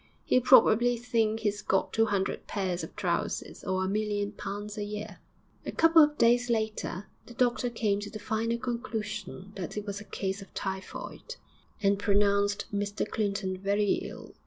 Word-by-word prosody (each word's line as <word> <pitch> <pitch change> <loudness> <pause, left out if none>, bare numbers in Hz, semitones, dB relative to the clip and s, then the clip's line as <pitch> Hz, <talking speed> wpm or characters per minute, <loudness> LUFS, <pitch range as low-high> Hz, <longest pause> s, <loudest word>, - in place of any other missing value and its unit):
He'll 255 - +4
probably 245 -1 +6
think 225 -2 0
he's 210 -1 -1
got 190 - 0
two 225 0 +3
hundred 200 -2 -1
pairs 185 -3 -2
of - - -8
trousers - - -2
or 190 0 0
a - - -1
million 205 0 -1
pounds 205 0 -6
a 210 - -3
year.' 210 0 -6 0.4
A - - -4
couple 330 0 +6
of 300 0 +4
days 240 +1 +4
later 220 -4 -1 0.2
the 240 - -12
doctor 245 0 +1
came 215 -4 0
to 205 0 -6
the - - -7
final 225 +1 -1
conclusion 215 -5 -4
that 185 +2 -5
it 210 - -3
was 200 0 -4
a - - -11
case 195 0 -3
of 195 - -12
typhoid, 190 -1 -5 0.5
and 200 0 +3
pronounced 205 0 +2
Mr 205 +1 -1
Clinton 200 -3 -2
very 200 +1 +1
ill. - - -9
210 Hz, 170 wpm, -29 LUFS, 200-230 Hz, 0.5 s, probably